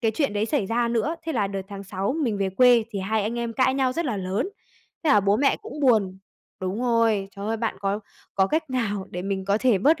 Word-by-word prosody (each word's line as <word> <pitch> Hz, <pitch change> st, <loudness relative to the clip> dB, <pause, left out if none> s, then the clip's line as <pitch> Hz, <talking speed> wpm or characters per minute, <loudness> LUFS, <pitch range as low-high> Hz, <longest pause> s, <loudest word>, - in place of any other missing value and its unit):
cái 225 Hz, -, +2 dB
chuyện 275 Hz, +2 st, 0 dB
đấy 210 Hz, +1 st, 0 dB
xảy 255 Hz, -6 st, 0 dB
ra 235 Hz, +3 st, +1 dB
nữa 235 Hz, +8 st, 0 dB
thế 325 Hz, -, -1 dB
là 215 Hz, -7 st, +1 dB
đợt 195 Hz, -1 st, -4 dB
tháng 200 Hz, -1 st, -8 dB
6 195 Hz, +3 st, -2 dB
mình 225 Hz, -7 st, 0 dB
về 195 Hz, -1 st, +1 dB
quê 240 Hz, +3 st, +5 dB
thì 205 Hz, -, -4 dB
hai 210 Hz, +3 st, 0 dB
anh 225 Hz, +4 st, -2 dB
em 235 Hz, -1 st, -2 dB
cãi 260 Hz, +2 st, +2 dB
nhau 265 Hz, -2 st, +1 dB
rất 335 Hz, +3 st, -2 dB
là 245 Hz, -8 st, -1 dB
lớn, 190 Hz, -, -2 dB, 0.6 s
thế 310 Hz, -, +3 dB
là 210 Hz, -, +6 dB
bố 200 Hz, +1 st, +2 dB
mẹ 275 Hz, +4 st, +3 dB
cũng 295 Hz, -, -8 dB
buồn. 215 Hz, -8 st, +3 dB, 0.4 s
Đúng 190 Hz, +4 st, -3 dB
rồi, 230 Hz, -5 st, +2 dB
trời 200 Hz, +1 st, -5 dB
ơi, 225 Hz, +1 st, 0 dB
bạn 225 Hz, 0 st, -2 dB
có 200 Hz, +1 st, -1 dB, 0.3 s
có 190 Hz, -, +3 dB
cách 310 Hz, +4 st, -1 dB
nào 210 Hz, -6 st, -1 dB
để 180 Hz, -, -5 dB
mình 195 Hz, 0 st, -2 dB
có 200 Hz, +2 st, +2 dB
thể 235 Hz, -5 st, +3 dB
bớt 310 Hz, -, +3 dB
220 Hz, 260 wpm, -25 LUFS, 195-250 Hz, 0.6 s, là